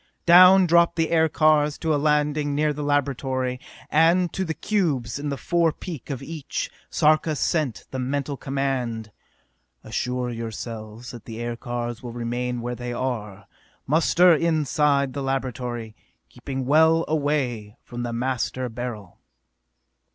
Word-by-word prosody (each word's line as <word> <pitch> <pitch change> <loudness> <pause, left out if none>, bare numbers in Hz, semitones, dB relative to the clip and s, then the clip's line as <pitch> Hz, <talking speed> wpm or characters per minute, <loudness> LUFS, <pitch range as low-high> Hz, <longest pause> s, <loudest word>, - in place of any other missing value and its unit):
Down 185 +2 +8
dropped 170 0 +4
the 165 -1 0
aircars 155 -2 +3
to 160 -1 0
a - - +2
landing 150 0 +1
near 150 0 +1
the 150 - -6
laboratory, 135 -3 -1 0.3
and 170 +3 +3
to 190 - -1
the 160 -3 -3
cubes 155 - -1
in 145 0 -3
the 140 - -3
forepeak 165 -2 -1
of 135 -2 -4
each 155 -1 -5 0.2
Sarka 155 0 +2
sent 145 -5 -1
the 130 - -4
mental 140 +2 -2
command: 130 -5 -3 0.7
"Assure 125 0 -2
yourselves 115 0 -7
that 120 -3 -11
the 115 -1 -8
aircars 120 0 -4
will 120 -2 -7
remain 120 +1 -3
where 120 +1 -3
they 125 0 -5
are! 105 -6 -4 0.4
Muster 170 +4 +4
inside 150 -4 +1
the 140 - -4
laboratory, 125 -4 -3 0.3
keeping 135 -2 -5
well 160 +4 +4
away 140 -8 -1
from 120 0 -7
the 120 -1 -3
Master 125 +1 -2
Beryl!" 115 -6 -7
135 Hz, 135 wpm, -24 LUFS, 120-155 Hz, 0.7 s, Down